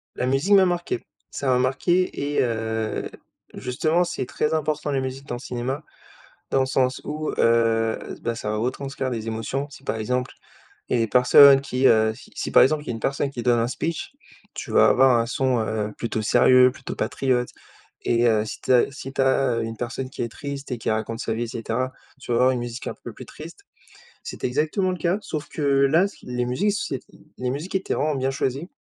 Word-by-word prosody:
La - - -1
musique 135 +10 +2
m'a 190 -1 +6
marqué. 175 -8 -1 0.3
Ça 140 - -4
m'a 130 -1 +4
marqué 145 +3 0
et - - +3
heu, 110 -2 -2 0.4
justement, 155 +7 0
c'est 175 -6 -3
très 150 +4 -1
important 150 -1 -1
la 135 - +1
musique 130 +1 -5
dans 120 - -4
le - - -7
cinéma 130 +3 -4 0.7
dans 135 - +2
le 130 - +2
sens 130 -1 0
où, 155 +1 -3
heu, 115 -1 +3 0.2
bah, 115 - -1
ça 105 - -4
va 110 - -1
retranscrire 130 +3 -3
des 115 -2 -4
émotions. 115 +5 -3
Si, 135 - -13
par 140 - -2
exemple, 125 +3 -2 0.6
il - - -1
y - - +3
a - - +1
les 115 - +1
personnes 135 +4 +7
qui, 135 -1 -1
heu, 110 -2 +5
si - - -15
si, - - -4
par - - +7
exemple, 150 +3 +1
il - - -18
y - - -5
a - - -3
une 115 - -6
personne 140 +1 0
qui 120 -4 -6
donne 120 -1 +3
un 115 - +1
speech, 165 +5 -4 0.4
tu - - -6
vas - - +6
avoir 130 -1 +5
un 115 - +1
son, 130 0 +1
heu, 110 -1 -2
plutôt 115 -2 -2
sérieux, 125 +4 +5
plutôt - - -8
patriote 125 -2 0 0.5
et 120 0 +2
heu, 110 -2 +2
si - - -7
tu - - -1
as 125 -1 +5
si 135 -1 -8
tu 135 - 0
as, 130 -2 +2
heu, - - -1
une 115 0 -5
personne 125 +2 -4
qui - - -7
est 115 - -3
triste 140 +2 -7
et 125 - -2
qui 115 - -3
raconte 110 +1 -2
sa 115 - -2
vie 115 +2 -2
et - - -4
cetera, 115 +3 -3 0.3
tu 125 - -7
vas 115 - +2
avoir 130 +1 +4
une 125 - -1
musique 120 0 -6
un - - -4
peu - - -6
plus - - -10
triste. - - -11 0.6
C'était - - -4
exactement 155 +8 0
le 180 - -4
cas 175 +4 0
sauf 155 -7 -5
que - - -7
là 140 +5 +4
ce 200 - -13
qui - - -18
les 125 0 -2
musiques 160 +13 +1
s 205 - -3 0.4
les 125 0 -2
musiques 155 +9 -5
étaient 190 - -1
vraiment 150 0 0
bien 135 0 0
choisies 135 +4 -2
130 Hz, 230 wpm, -24 LUFS, 115-140 Hz, 0.7 s, personnes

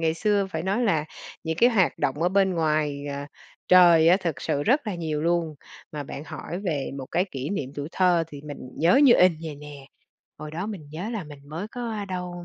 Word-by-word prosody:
ngày 160 -1 +1
xưa 205 +2 +1
phải 160 -2 -3
nói 195 +6 0
là 160 -9 +1 0.4
những 160 0 -2
cái 240 +8 +5
hoạt 195 -7 +2
động 140 +4 -1
ở 175 - +3
bên 190 0 +2
ngoài, 155 -3 0
à, 140 0 -5 0.4
trời 170 -3 +7
á, 180 - +6
thực 170 -6 -3
sự 145 -3 -1
rất 265 - +2
là 210 - -2
nhiều 160 -3 -3
luôn, 170 -2 0 0.4
mà 150 -1 -4
bạn 140 +1 -8
hỏi 175 - -6
về 150 -7 -2
một 130 - -6
cái 175 +3 +1
kỷ 135 +3 -4
niệm 145 -10 -3
tuổi 145 +1 -5
thơ 180 -3 +3
thì 145 -3 -9
mình 145 -1 -7 0.2
nhớ 170 +3 +4
như 270 -4 +8
in 180 0 +5
vầy 155 -2 -5
nè, 145 -2 -11 0.5
hồi 155 0 -7
đó 170 +6 -4
mình 190 -9 -7
nhớ 175 +8 -5
là 215 -6 -4
mình 145 -2 -12
mới 165 +7 -5
có 230 -4 -4
đâu 180 -1 -5
165 Hz, 225 wpm, -25 LUFS, 150-190 Hz, 0.5 s, như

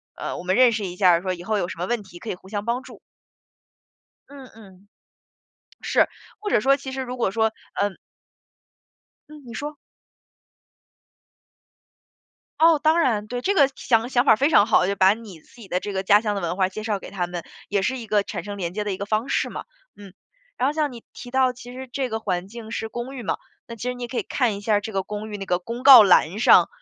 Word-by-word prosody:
呃， - - -5
我 - - -7
们 185 +1 0
认 250 0 +6
识 215 -3 -2
一 180 -1 -6
下， 180 -3 +4
说 185 -1 -2
以 175 -1 -9
后 215 +3 -1
有 175 - -1
什 170 - -8
么 180 - -1
问 240 -2 -1
题 175 -2 -13
可 225 - -8
以 - - -2
互 190 - -18
相 205 -1 -3
帮 235 +2 -1
助。 - - -13 1.3
嗯 275 -2 -12
嗯。 200 -2 -17 1.0
是， - - +3 0.3
或 425 - -5
者 310 - +3
说 275 +4 +4
其 265 -1 -8
实 265 0 -3
如 250 0 -6
果 235 - 0
说， 220 +1 +2 0.3
呃 205 - 0 1.4
嗯， 305 -1 -13
你 235 - -9
说。 295 +3 -5 2.8
哦， 325 -1 +6
当 320 +2 +4
然， 220 -8 +1
对， 245 +3 -4
这 400 - +1
个 280 -7 +5
想 230 0 +1
想 245 0 +2
法 225 - +6
非 280 +4 +2
常 295 - +6
好， 205 -4 +3
就 200 - 0
把 190 0 +5
你 215 -7 -12
自 - - -23
己 205 - -11
的 180 0 -1
这 205 - -5
个 190 0 -2
家 205 +2 +6
乡 210 -2 -2
的 - - -2
文 175 0 -3
化 190 -1 +2
介 215 +3 -7
绍 210 -3 -1
给 - - -10
他 185 -3 -2
们， 175 -1 -6 0.3
也 200 -1 0
是 260 +7 -1
一 235 - -8
个 210 -1 +2
产 190 -3 -6
生 205 -1 -6
连 175 -3 -4
接 210 +1 -3
的 205 - -2
一 - - -3
个 200 - -5
方 215 +4 -1
式 - - 0
嘛， - - -7 0.3
嗯。 200 -2 -13 0.4
然 260 - +1
后 290 - 0
像 300 -3 -1
你 235 -2 -10
提 245 - -11
到 260 -1 +3
其 245 0 -12
实 260 0 -8
这 265 -2 -2
个 220 0 -3
环 180 -4 -2
境 220 +1 -10
是 220 -1 -4
公 245 +4 -6
寓 245 - -7
嘛， - - -1 0.3
那 235 - -8
其 230 - -12
实 250 - -2
你 245 - -6
也 240 - -6
可 255 - -7
以 - - 0
看 240 -6 0
一 - - -7
下 210 0 +2
这 210 +2 -6
个 195 -1 -1
公 210 +2 -6
寓 205 - -4
那 195 - -7
个 180 -1 +1
公 230 +7 -7
告 260 -5 +10
栏 195 0 +4
上， - - +6
220 Hz, 260 characters per minute, -23 LUFS, 195-250 Hz, 2.8 s, 告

